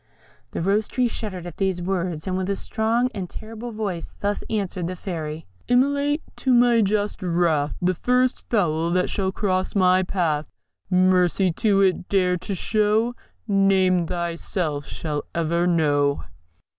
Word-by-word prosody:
The - - -4
Rose 205 +3 +2
tree 250 -1 +1
shuddered 195 -6 -5
at 175 -2 -8
these 190 -2 0
words, 175 -3 -2
and 185 -1 -2
with 185 0 -2
a 200 - +1
strong 230 +5 0
and 190 -4 -5
terrible 225 +2 -8
voice 200 -6 -4
thus 205 0 -1
answered 195 -5 -2
the 185 - -4
Fairy: 160 -4 -5 0.2
Immolate 285 +4 +2
to 260 -2 +2
my 240 -1 +5
just 205 +1 0
wrath 170 -5 +1
The 180 +1 +3
first 250 +7 0
fowl 170 -7 +1
that 180 0 +1
shall 190 -2 0
cross 190 -1 -1
thy 185 -1 +4
path. 165 -6 -1 0.4
Mercy 185 0 +3
to 195 +3 +2
it 185 -2 +1
dare 180 -2 +2
to 195 +3 -4
show 215 +5 +1 0.3
None 190 -3 +3
thyself 170 -3 -3
shall 150 -2 -4
ever 170 +1 +1
know! 145 -4 +2
185 Hz, 150 wpm, -23 LUFS, 170-210 Hz, 0.4 s, my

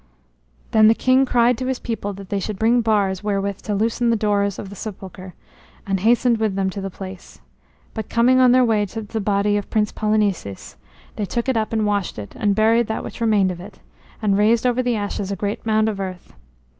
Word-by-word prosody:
Then 215 -1 +6
the 225 - +5
king 260 +2 +3
cried 240 -1 +3
to 255 - -3
his 260 -1 -1
people 225 -4 -4
that 195 0 -11
they 200 - -1
should 205 +1 -4
bring 235 +3 +3
bars 205 -4 0
wherewith 200 -1 -1
to 210 - -4
loosen 230 +3 0
the 230 - +3
doors 205 -2 0
of 195 - -7
the - - -9
sepulchre, 190 -3 -9 0.5
and 195 -1 -1
hastened 235 +2 +3
with 215 -3 0
them 190 -1 0
to 200 - -6
the 195 - -4
place. 190 0 -10 0.5
But 220 -2 -5
coming 245 +2 +4
on 255 -1 +6
their 255 0 +5
way 215 -3 +1
to 220 +4 -6
the 220 +1 -4
body 205 0 +1
of 205 - -5
Prince 210 -2 +1
Polynices, 205 - -1 0.4
they 210 - -1
took 235 +5 -3
it 260 - +1
up 220 -1 -1
and 220 -1 0
washed 205 -3 -1
it, 105 -1 -8
and 205 -2 +1
buried 225 +2 +3
that 220 - -3
which - - -9
remained 210 -5 +3
of 175 - -7
it, 200 +3 -12 0.5
and 200 -1 +2
raised 225 +3 +3
over 250 0 +2
the 245 -2 0
ashes 205 -1 -3
a - - -1
great 205 +3 -4
mound 220 0 +2
of 210 -3 -2
earth. 185 -2 -6
210 Hz, 220 wpm, -21 LUFS, 195-230 Hz, 0.5 s, Then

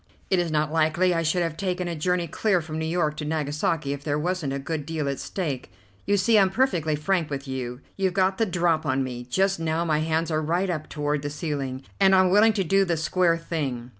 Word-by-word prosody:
It 190 - +4
is 175 -1 0
not 155 -1 0
likely 165 +3 +2
I 165 - +1
should 165 +2 +1
have 165 -2 -2
taken 180 -1 -2
a 170 - -3
journey 175 +2 0
clear 190 +4 +1
from 160 -1 -5
New 160 - -2
York 160 -3 0
to 150 - -4
Nagasaki 150 -1 -1
if 140 0 -7
there 145 -1 0
wasn't 170 -2 -1
a 135 - -2
good 150 +2 -3
deal 155 -1 -3
at 140 -1 -2
stake. 150 -9 -4 0.4
You 205 0 +3
see, 215 +3 +4
I'm 190 -1 +4
perfectly 180 - +1
frank 165 +2 0
with 140 -1 -5
you. 130 -1 -5 0.2
You've 190 -2 0
got 190 0 +2
the 225 - +2
drop 170 -3 +1
on 135 -3 0
me. 125 -1 -6
Just 195 +4 +1
now 165 +1 0
my 155 -2 +1
hands 160 +1 0
are 155 0 +1
right 175 +4 0
up 155 -3 -4
toward 150 -1 -1
the 145 - -3
ceiling, 140 -3 -4 0.2
and 195 -1 +6
I'm 185 -1 +4
willing 215 +3 +5
to 200 -2 0
do 195 +3 +3
the 175 -3 0
square 170 +1 +2
thing. 135 -8 -4
160 Hz, 235 wpm, -25 LUFS, 150-185 Hz, 0.4 s, and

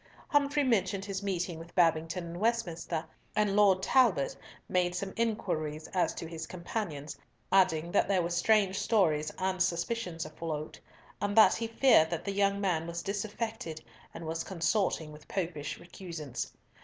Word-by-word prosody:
Humfrey 290 0 +3
mentioned 200 -6 +1
his 195 -1 -3
meeting 180 -4 -2
with 165 +1 -12
Babington 165 0 +2
in 170 - -6
Westminster, 175 -7 -1 0.3
and 210 -2 +2
Lord 195 -3 +5
Talbot 205 - +3 0.3
made 180 -1 +1
some 190 +1 -3
inquiries 155 -9 -1
as 180 - 0
to - - -5
his 160 -1 -6
companions, 170 -5 -4 0.4
adding 175 -4 +3
that 205 - +3
there 190 -3 +2
were 170 - -2
strange 195 +2 +3
stories 155 -9 +2
and 185 -1 -1
suspicions 180 -1 -1
afloat, 155 -1 -5 0.4
and 205 +1 -1
that 220 - +8
he 230 - -2
feared 225 -8 +5
that 170 -1 -3
the 200 - -2
young 200 0 +2
man 175 -5 0
was 170 0 -4
disaffected 205 -4 -3 0.3
and 165 - -8
was 165 +1 -2
consorting 170 -3 0
with 150 0 -13
Popish 165 -6 -3
recusants. 170 -7 -6
180 Hz, 155 wpm, -31 LUFS, 165-205 Hz, 0.4 s, that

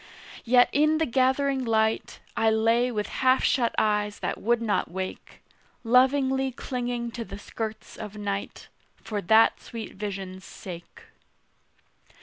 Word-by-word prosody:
Yet, 245 +1 +6
in 305 +2 +3
the 320 - +1
gathering 265 +1 +1
light, 220 -1 0
I 225 - +3
lay 230 +3 +2
with 210 -3 -2 0.2
half 260 0 +4
shut 240 -4 +2
eyes 210 -1 +1
that - - -4
would 235 +1 +2
not 225 -3 0
wake, 185 +2 -7 0.4
Lovingly 265 +2 +3
clinging 245 -2 -4
to 235 0 -5
the 210 - -9
skirts 220 +1 -6
of 210 -1 -8
night 200 -1 -4 0.3
For 210 -2 -5
that 220 +4 +4
sweet 230 -2 -8
vision's 195 -2 -6
sake. 185 - -10
230 Hz, 130 wpm, -26 LUFS, 210-255 Hz, 0.4 s, Yet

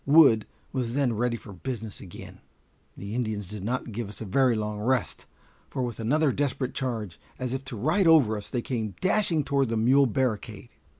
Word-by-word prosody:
Wood 140 -7 +6 0.3
was 125 -2 -2
then 135 -5 +2
ready 120 +1 0
for 105 -3 -11
business 110 +3 -5
again. 90 - -10 0.6
The 100 +2 -6
Indians 110 -5 -2
did 105 -3 -6
not 120 +2 -2
give 110 -1 -4
us 105 - -9
a 110 - -5
very 125 +4 +3
long 105 -1 -3
rest, 120 -2 -1 0.4
for 130 - -2
with 120 -3 -4
another 145 +6 +2
desperate 135 -1 -1
charge, 110 -9 -3 0.2
as 130 -1 -3
if 135 0 -3
to 130 -4 -6
ride 155 - +2
over 145 -10 +6
us, 105 -1 -7
they 120 -2 -2
came 110 -5 -3
dashing 185 -5 +2
toward 140 -3 +1
the 115 - 0
mule 130 +5 +5
barricade. 115 -2 -2
120 Hz, 190 wpm, -27 LUFS, 110-135 Hz, 0.6 s, Wood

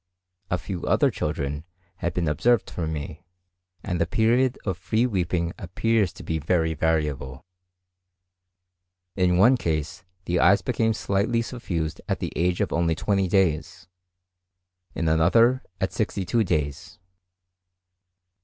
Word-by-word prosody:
A 90 - +1
few 90 0 -6
other - - +3
children 75 -1 -3 0.3
have 85 -1 -3
been 85 -2 0
observed 115 +10 +2
for 85 -3 -3
me, 80 +1 -5 0.6
and 90 -3 -2
the 85 - +2
period 120 +6 +2
of 95 -4 -1
free 100 +7 0
weeping 90 -6 -1
appears 100 +1 0
to - - -11
be 80 0 -2
very 80 +1 +1
variable. 75 -4 -1 1.7
In 90 -2 +2
one 120 +8 +6
case, 80 - -3 0.2
the 90 +1 0
eyes 95 +3 +5
became 115 -3 +1
slightly 105 +4 0
suffused 90 - -4
at - - +1
the - - -5
age 90 0 +1
of - - -1
only 85 -1 +1
20 100 +2 0
days; 85 -6 0 1.1
in 80 - -1
another, 115 +11 +4 0.2
at 95 - -1
62 105 +1 0
days. 85 +2 -2
90 Hz, 130 wpm, -25 LUFS, 80-100 Hz, 1.7 s, one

